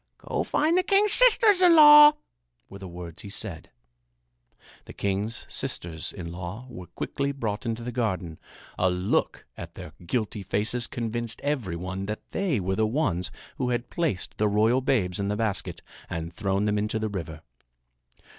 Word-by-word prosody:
"Go - - -3
find 315 +3 +1
the 365 - +4
king's 400 +2 +3
sisters 445 -6 +5
in 350 -2 +7
law," 295 -1 +10 0.5
were 100 - -11
the 95 - -8
words 85 -1 -9
he 100 - -9
said. 100 -5 -5 1.2
The - - -11
king's 100 +3 -2
sisters 80 -2 -4
in 85 -4 -7
law 90 +7 -7
were 90 -7 -9
quickly 140 +10 -3
brought 115 -5 -4
into 115 0 -3
the 125 - -4
garden. 95 -9 -2 0.4
A 90 - +3
look 90 +2 -1
at - - -9
their - - -9
guilty 105 +2 -2
faces 110 +5 -1
convinced 115 -1 -3
every 130 - -1
one 95 +3 -5
that 105 +1 -6
they 185 - 0
were 95 +1 -1
the 110 +1 +2
ones 110 - 0 0.3
who 125 -2 -1
had 120 0 -2
placed 160 - -2
the 105 - +3
royal 110 +5 +3
babes 105 -9 0
in 100 - -1
the 105 - -1
basket 110 -3 -3 0.3
and 85 0 -4
had - - -22
thrown 100 +1 -1
them 105 0 +1
into 105 +1 -1
the 110 0 -1
river. 80 -5 -6
105 Hz, 175 wpm, -26 LUFS, 95-125 Hz, 1.2 s, law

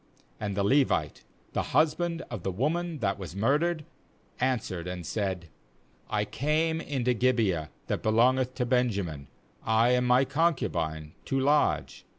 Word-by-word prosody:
4And 100 -2 -2
the 100 - +1
Levite, 135 +6 +2 0.3
the - - +1
husband 165 +2 +1
of 110 -6 -4
the 95 - -2
woman 155 - -1
that 100 -1 0
was 90 -2 -7
murdered, 150 - +1 0.5
answered 110 -9 -1
and 90 -2 -5
said: 95 -3 -2 0.6
'I - - 0
came 160 +3 0
into 125 -5 0
Gibeah 110 -10 +1 0.2
that - - -2
be - - 0
longeth 130 +3 +3
to 125 - -1
Benjamin, 100 - 0 0.4
I 110 +2 +3
and 125 0 +2
my 125 +2 +5
con 165 +4 +2
cubine, 80 - -3
to 135 - 0
lodge. 145 +3 +1
125 Hz, 150 wpm, -28 LUFS, 95-145 Hz, 0.6 s, my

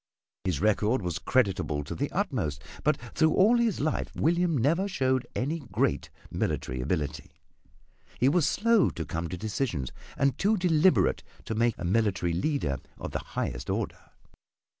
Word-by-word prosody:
His 90 -6 0
record 110 +2 +2
was 85 -4 -2
creditable 95 - +1
to 70 - -6
the 145 - -2
utmost, 110 - -2 0.2
but 150 -1 +3 0.2
through 160 -1 +3
all 215 +6 +5
his 230 -4 +1
life 155 +2 -1
William 170 -1 +2
never 165 - +2
showed 130 -9 0
any 150 +6 -1
great 140 - -1 0.2
military 65 0 -2
ability. 75 +1 -2 0.9
He 125 - +4
was 150 +1 +3
slow 230 +5 +3
to 80 - -5
come 80 0 -3
to 90 - -4
decisions 100 - -2 0.3
and 140 -1 +1
too 210 +2 +3
deliberate 180 0 +3 0.2
to - - -3
make 115 +1 +2
a 90 - -5
military 95 -3 +1
leader 85 - 0 0.2
of - - -6
the - - -2
highest - - -4
order. - - -3
130 Hz, 155 wpm, -28 LUFS, -, 0.9 s, all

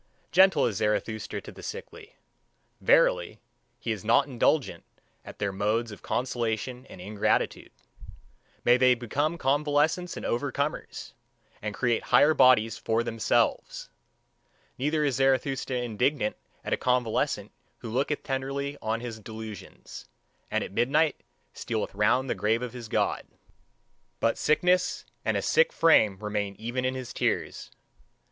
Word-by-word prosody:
Gentle 185 -3 +5
is 105 -5 -1
Zarathustra 110 0 -2
to - - -10
the - - -12
sickly. 460 0 -9 0.7
Verily, - - +3 0.4
he 115 - -3
is 105 -4 -4
not 120 +5 +4
indignant 130 - 0 0.4
at - - -11
their 100 -1 -1
modes 110 +4 -1
of 105 - -11
consolation 125 +1 -2
and - - -11
ingratitude. 105 +3 -1 0.9
May 120 +1 +6
they 125 0 +5
become 145 +7 -1
convalescents 150 +4 +1
and - - -6
overcomers, 140 +4 -3 0.5
and 105 0 -4
create 120 -3 0
higher 155 +2 +5
bodies 125 -6 +4
for 115 +1 0
themselves! 115 -1 0 0.9
Neither 150 +3 0
is 140 -3 0
Zarathustra 135 -1 +1
indignant 120 +1 0 0.3
at - - -1
a - - +1
convalescent 125 -3 0 0.3
who 115 - -6
looketh 140 +5 -1
tenderly 140 +1 -3
on 110 +1 -2
his 115 -2 -6
delusions, 110 -2 -9 0.4
and - - 0
at - - -7
midnight 145 +4 +1 0.3
stealeth 110 -2 -3
round 105 +6 +2
the - - 0
grave 110 +3 0
of 125 -1 -5
his 120 -2 -8
God; - - 0 0.9
but 115 - +2
sickness 180 +4 +2 0.2
and - - 0
a - - -2
sick - - +3
frame 110 - +4
remain 105 -1 -3
even 120 +3 -3
in 130 0 0
his 130 -2 -6
tears. - - -2
125 Hz, 135 wpm, -27 LUFS, 110-145 Hz, 0.9 s, May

